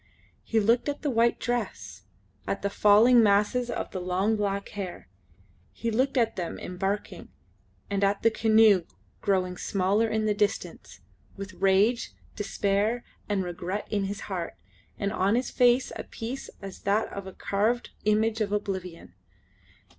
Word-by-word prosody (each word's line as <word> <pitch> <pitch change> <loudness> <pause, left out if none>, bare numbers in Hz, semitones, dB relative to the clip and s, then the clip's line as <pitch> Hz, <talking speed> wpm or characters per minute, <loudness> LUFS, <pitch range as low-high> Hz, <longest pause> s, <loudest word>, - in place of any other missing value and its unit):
He 225 - +1
looked 230 +6 +2
at 290 - -5
the 290 - 0
white 235 0 +2
dress, 240 0 -4 0.4
at - - -2
the 200 - 0
falling 220 +5 +6
masses 210 +4 +2
of - - -4
the 185 - -4
long 185 +5 +1
black 200 -1 -2
hair. 195 -4 -6 0.7
He 230 0 -3
looked 260 +5 +1
at 230 -2 +2
them 175 -2 -4
embarking, 195 +3 -4 0.6
and 200 0 -1
at 200 0 +1
the 230 - +5
canoe 220 -5 +5 0.4
growing 185 -2 0
smaller 200 +3 +1
in 220 0 -1
the 210 - +2
distance, 205 0 -3 0.4
with 195 -1 -7
rage, 195 +6 +2 0.2
despair, 205 +3 0 0.3
and 200 -2 +1
regret 180 +3 -4
in 205 -2 0
his 200 +1 -5
heart, 180 -4 -4 0.4
and 200 0 -2
on 200 +1 +2
his 250 +1 -1
face 245 +1 +3
a - - -5
peace 245 +4 -6
as 195 -1 -8
that 205 +2 +1
of 200 -1 -6
a 190 - -8
carved 215 +7 -1
image 220 +1 +2
of 205 -2 0
oblivion. 190 -4 -4
205 Hz, 155 wpm, -27 LUFS, 195-225 Hz, 0.7 s, falling